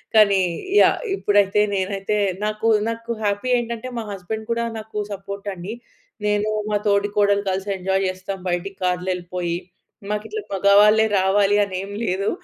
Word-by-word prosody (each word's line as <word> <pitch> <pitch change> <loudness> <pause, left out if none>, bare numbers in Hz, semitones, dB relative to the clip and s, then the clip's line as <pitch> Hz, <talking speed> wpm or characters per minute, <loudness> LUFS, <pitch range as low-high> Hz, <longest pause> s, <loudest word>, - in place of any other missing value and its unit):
కానీ 200 -3 +6 0.4
యాహ్! - - +4 0.2
ఇప్పుడైతే 205 0 +3
నేనైతే 195 +2 -1 0.3
నాకు 215 +1 -1 0.2
నాకు 230 +1 -5
హ్యాపీ 205 +5 0
ఏంటంటే, 235 +1 -5
మా 220 - -5
హస్బెండ్ 215 +4 -6
కూడా 235 0 -1
నాకు 215 0 -9 0.2
సపోర్టండి. 200 0 -6 0.5
నేనూ, 210 +1 +1 0.2
మా 210 - +2
తోడికోడలు 205 0 +2
కలిసి 190 +2 -2
ఎంజాయ్ 190 +1 0
చేస్తాం, 185 +1 -5
బయిటికి 180 +2 -2
కార్‌లో 180 0 0
యెళ్ళిపోయి. 175 -1 -3 0.6
మాకిట్లా 220 - -3
మగవాళ్ళే 205 +3 +5
రావాలి 200 +2 +3
అనేం 195 0 -5
లేదు. 190 +2 0
200 Hz, 130 wpm, -22 LUFS, 190-210 Hz, 0.6 s, కానీ